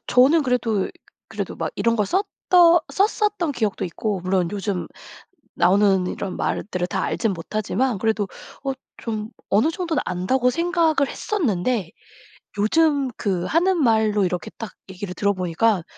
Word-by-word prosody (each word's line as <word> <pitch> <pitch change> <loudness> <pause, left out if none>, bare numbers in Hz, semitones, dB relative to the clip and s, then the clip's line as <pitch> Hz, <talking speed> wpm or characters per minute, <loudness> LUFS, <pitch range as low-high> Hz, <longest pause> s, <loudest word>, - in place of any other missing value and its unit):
저는 280 +6 +5
그래도 240 -6 0 0.4
그래도 - - -5
막 - - -2
이런 230 0 +1
걸 210 -2 +1
썼던 360 - +4
썼었던 405 -5 +1
기억도 220 -6 -1
있고 190 +2 -3
물론 185 -1 0
요즘 200 -2 -2 0.7
나오는 195 -1 +3
이런 190 0 -4
말들을 180 -3 -2
다 - - -2
알지는 220 -5 0
못하지만 215 +6 -1
그래도 220 -2 0 0.4
어 270 - 0 0.3
좀 215 -1 -4 0.2
어느 215 +10 +3
정도는 340 -3 -1
안다고 210 +9 +1
생각을 330 -2 +1
했었는데 235 - -1 0.7
요즘 285 +5 +3
그 185 -4 -1
하는 345 - +2
말로 220 -5 +3
이렇게 180 -3 -2
딱 225 -3 -6 0.2
얘기를 185 0 -6
들어보니까 185 0 +1
220 Hz, 305 characters per minute, -22 LUFS, 190-295 Hz, 0.7 s, 저는